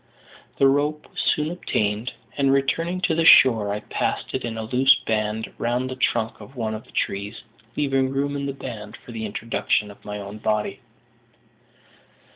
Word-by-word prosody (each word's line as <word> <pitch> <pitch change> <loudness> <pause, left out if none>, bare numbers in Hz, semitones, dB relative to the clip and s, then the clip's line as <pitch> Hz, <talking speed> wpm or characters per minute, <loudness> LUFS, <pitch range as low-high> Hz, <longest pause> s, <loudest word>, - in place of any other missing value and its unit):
The 135 - +5
rope 145 +2 0
was - - -2
soon 150 +2 +1
obtained; 110 - -1 0.2
and, 135 -1 +2
returning 165 +7 +1
to 180 - +2
the 165 +1 +2
shore, 115 -9 +7
I 105 +1 -2
passed - - -2
it 130 - -2
in 115 -1 -4
a 110 - -3
loose 125 +4 +5
band 110 0 -2
round 125 +2 -1
the - - -4
trunk 110 -3 0
of 120 +7 -12
one 110 -3 -2
of 110 - -7
the - - -20
trees, 100 +3 -3 0.3
leaving 135 -2 +1
room 140 +1 -1
in 140 0 -2
the - - -1
band 110 -6 -8
for - - -13
the 110 -1 -4
introduction 105 0 -1
of 100 - -17
my 105 0 -5
own 100 +1 -8
body. 105 0 -1
120 Hz, 180 wpm, -24 LUFS, 105-140 Hz, 0.3 s, shore